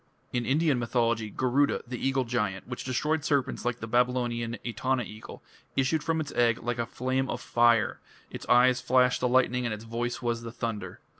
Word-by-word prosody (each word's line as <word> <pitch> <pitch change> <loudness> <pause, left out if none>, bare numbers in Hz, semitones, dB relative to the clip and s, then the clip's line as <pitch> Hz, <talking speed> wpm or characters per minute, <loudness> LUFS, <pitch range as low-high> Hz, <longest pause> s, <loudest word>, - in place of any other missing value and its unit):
In 120 -1 -1
Indian 145 -1 +2
mythology 115 -2 0
Garuda, 130 +6 +1
the 125 0 -6
eagle 135 0 +1
giant, 105 -6 -2
which 125 0 -5
destroyed 150 +4 0
serpents 140 -5 0
like 125 -1 -1
the 110 - -4
Babylonian 120 -1 0
Etana 130 +1 -1
eagle, 110 0 -10 0.3
issued 140 +4 +1
from 160 +1 0
its 150 -3 -4
egg 120 -2 +2
like 120 0 -2
a 115 - -1
flame 130 +2 -1
of - - -3
fire; 120 -2 +3 0.3
its - - -8
eyes 125 +1 +5
flashed 125 0 +3
the 125 - +2
lightning 125 0 +2
and 115 -3 -1
its 105 - -11
voice 120 +1 -3
was 120 -1 -2
the 115 0 -7
thunder. 115 -2 -5
125 Hz, 190 wpm, -28 LUFS, 115-130 Hz, 0.3 s, eyes